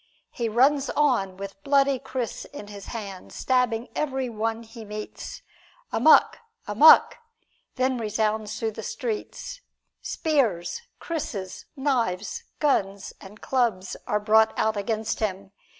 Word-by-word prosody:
He 235 -2 -2
runs 270 +5 +3
on 240 -11 +2
with 195 0 -8
bloody 275 -1 +3
kris 255 -3 -4
in 205 - -10
his 200 -1 -9
hand, 200 -5 -7
stabbing 250 -2 0
every 265 -4 -1
one 225 +1 -2
he 230 0 -11
meets. 210 0 -7 0.5
"Amok! 275 +8 +5 0.3
Amok!" 230 - +7 0.6
then 255 -1 +1
resounds 215 -1 -1
through 225 -1 -1
the - - -7
streets. 485 +2 -5 0.4
Spears, 275 - 0 0.2
krises, 210 - -5
knives, 235 -9 -1
guns 200 -9 0
and 205 +2 -13
clubs 230 -8 0
are 210 - +1
brought 220 +1 +4
out 220 0 +1
against 215 +2 -2
him. 195 -2 -3
225 Hz, 120 wpm, -25 LUFS, 205-265 Hz, 0.6 s, Amok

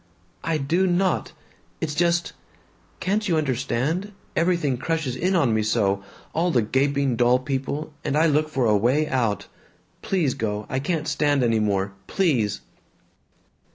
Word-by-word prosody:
"I 165 -1 0
do 165 +7 +1
not! 185 +1 +1 0.5
It's 150 - -2
just 170 +2 +1 0.7
Can't 210 +3 0
you 165 - +3
understand? 145 - -1 0.2
Everything 170 -5 +1
crushes 155 -2 -2
in 185 +8 0
on 140 -10 +3
me 110 - +2
so, 100 -2 +1 0.3
all 170 +3 +1
the 125 -9 +2
gaping 135 +2 +1
dull 120 +1 +4
people, 140 +3 -3
and 140 - 0
I 160 - +4
look 155 0 +2
for 135 -5 0
a 105 -2 +4
way 130 +9 +2
out 120 -7 0 0.6
Please 185 - 0
go. 105 -1 -3
I 130 - -1
can't 155 +2 -2
stand 145 -3 +2
any 115 -2 +2
more. 100 -2 0
Please!" 125 - +1
140 Hz, 150 wpm, -24 LUFS, 120-165 Hz, 0.7 s, dull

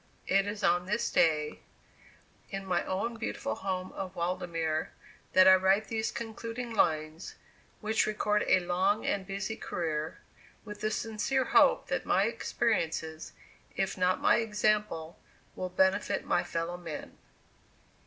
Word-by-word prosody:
It 195 +1 +2
is 205 0 -4
on 180 +1 +2
this 210 +4 0
day, 150 -2 +2 0.9
in 195 -1 -5
my 180 -2 0
own 225 +5 -2
beautiful 220 - -3
home 185 - -3
of 190 -1 -6
Waldemere, 170 -3 -1 0.4
that 185 0 +7
I 190 - +10
write 190 +2 +3
these 220 -1 -1
concluding 230 +1 -5
lines, 155 -3 0 0.5
which 220 0 +1
record 210 0 +1
a 185 - +5
long 185 +4 +1
and 195 -2 -1
busy 200 +2 -3
career, 160 -6 -3 0.5
with 210 -1 -9
the 215 - +1
sincere 225 +5 0
hope - - +5
that - - -1
my - - +3
experiences, 165 -8 -1 0.4
if 195 -1 -1
not 185 0 +2
my - - +4
example, 210 -7 0 0.4
will 185 - -3
benefit 190 +2 +1
my 175 - +2
fellow 170 +1 -3
men. 165 -4 -8
190 Hz, 135 wpm, -30 LUFS, 175-215 Hz, 0.9 s, I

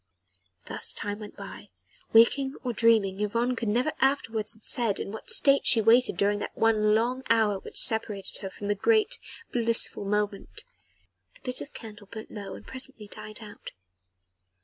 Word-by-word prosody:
Thus - - -2
time 205 0 -5
went 210 -1 -11
by - - -10 0.4
waking 265 +4 +4
or 245 -2 -2
dreaming, 215 -4 +2
Yvonne 235 +4 -1
could 230 -1 -4
never 250 +8 0
afterwards 230 -6 0
have 220 -1 -23
said 230 -5 +1
in - - -5
what 220 - -8
state 275 0 +6
she 230 - +9
waited 230 +3 +3
during 205 +1 +1
that - - -7
one 215 -1 +3
long 245 +4 0
hour 220 -3 +2
which - - -10
separated 215 -3 +2
her 195 - -5
from 200 +2 -8
the 205 - +2
great, 435 - +1 0.3
blissful 230 -3 +1
moment. 205 0 -3 0.7
The - - -21
bit 250 -1 -4
of 285 - -10
candle 210 -2 -11
burnt 220 +2 -10
low 200 -2 -7
and - - -13
presently 260 -5 -6
died 215 +2 -9
out. 210 -1 -11
220 Hz, 170 wpm, -27 LUFS, 205-240 Hz, 0.7 s, she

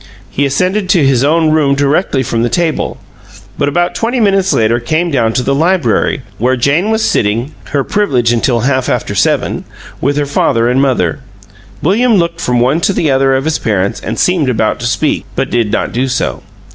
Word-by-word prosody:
He 140 +1 0
ascended 185 +8 -1
to 170 -6 +3
his 135 -2 +2
own 160 +2 +2
room 145 -3 +2
directly 140 0 +1
from 115 -1 -2
the 120 - +1
table, 165 +5 -1 0.6
but 145 - +1
about 175 +4 0
twenty 240 +2 -1
minutes 195 -3 +2
later 115 +2 +2
came 160 +8 -1
down 115 -5 +1
to 125 - 0
the 140 - 0
library, 165 -3 +1 0.2
where 125 +3 +2
Jane 145 - +1
was 220 0 0
sitting 115 +7 0
(her 140 -1 -1
privilege 130 - +1
until 120 0 +1
half 130 +1 0
after - - -2
seven) - - 0 0.4
with 140 +2 0
her 145 - +1
father 115 -4 +1
and 125 +2 +2
mother. 95 - 0 0.6
William 220 +8 +2
looked 170 -2 0
from 125 -1 0
one 135 +7 +1
to 195 - +1
the 160 -5 0
other 135 0 +2
of 135 +2 -1
his 160 0 0
parents 100 -3 -1
and - - -5
seemed 175 -7 +1
about 110 -3 0
to 120 - -2
speak, 150 +5 0
but 135 0 -2
did 115 -3 0
not - - -1
do 130 +3 0
so. 130 0 -2
140 Hz, 195 wpm, -13 LUFS, 120-170 Hz, 0.6 s, to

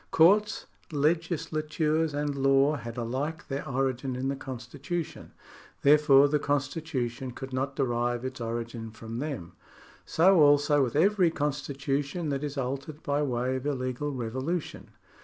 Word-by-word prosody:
Courts, 205 +6 +4 0.3
legislatures, 155 0 0
and 145 0 -1
law 135 +2 +3
had 120 -4 -7
alike 130 +7 -3
their 140 +1 -4
origin 130 0 -1
in 130 +2 -2
the 140 - -1
constitution, 135 +6 -6 0.5
therefore 145 -1 +6
the 150 +1 +1
constitu 145 -1 -1
tion 120 +2 -7
could 130 +2 -8
not 135 +2 -2
derive 120 -2 0
its 130 -1 -5
origin 115 0 -4
from 115 +1 -7
them. 125 - -4 0.6
80 - - -3
also 145 -4 +5
with 120 -1 -2
every 185 +2 +4
constitution 145 +1 -2
that 140 0 -2
is 145 -1 -4
altered 135 +4 -4
by 145 -2 0
way 130 -2 0
of 130 +2 -5
illegal 130 +1 -2
revolution. 130 +7 -4
140 Hz, 140 wpm, -28 LUFS, 130-150 Hz, 0.6 s, therefore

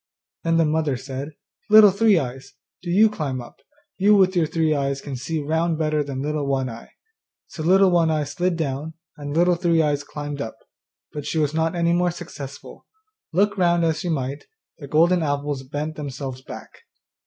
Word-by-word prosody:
Then 165 0 +2
the 165 - +4
mother 155 -3 0
said, 135 +3 -6 0.4
'Little 215 -1 +9
Three 200 0 +4
eyes, 135 -1 -5 0.3
do 175 - -7
you 205 +5 +5
climb 150 -11 -3
up; 120 -1 -11 0.4
you 205 +2 +5
with 190 -1 +4
your 165 -3 +2
three 160 -1 +1
eyes 140 -1 -1
can 140 -1 -6
see 140 +6 -3
round 160 +2 0
better 155 -1 0
than 135 -1 -5
Little 150 -1 -2
One 135 -2 0
eye.' 115 +1 -11 0.6
So 160 - -9
Little 190 +3 +4
One 170 -2 +3
eye 155 -1 +1
slid 180 +4 -1
down, 155 +1 -3 0.2
and 145 +1 -5
Little 175 +1 +4
Three 170 -1 +1
eyes 145 -1 0
climbed 145 -1 -6
up; 110 - -6 0.6
but 150 -1 -6
she - - -2
was 150 -1 +1
not 160 +1 0
any 170 0 +2
more 175 +1 +2
successful; 155 -5 -9 0.4
look 205 +5 +2
round 175 -1 +3
as 160 -1 0
she 180 - -3
might, 140 -2 -3 0.3
the 145 - -8
golden 170 +5 +3
apples 145 -2 -2
bent 150 +4 -5
themselves 135 -3 -6
back. - - -10
155 Hz, 190 wpm, -23 LUFS, 140-170 Hz, 0.6 s, Little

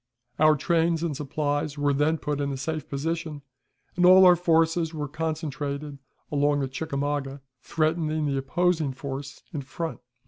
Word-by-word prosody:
Our 155 0 +6
trains 165 +2 +1
and 160 -4 -1
supplies 145 +1 -2
were 145 0 +2
then 150 +3 +2
put 150 -2 -3
in 140 0 -1
a 135 - -3
safe 155 +3 -4
position, 155 +1 -3 0.5
and 180 - +1
all 185 +1 +8
our 180 -1 +8
forces 165 -1 +2
were 150 -1 -3
concentrated 150 -2 -4 0.3
along 145 0 +2
the 135 - -1
Chickamauga, 140 0 -3 0.2
threatening 155 0 0
the 140 -2 0
opposing 160 +1 0
force 140 +1 -7
in 150 - -3
front. 160 +5 -5
150 Hz, 150 wpm, -26 LUFS, 140-165 Hz, 0.5 s, all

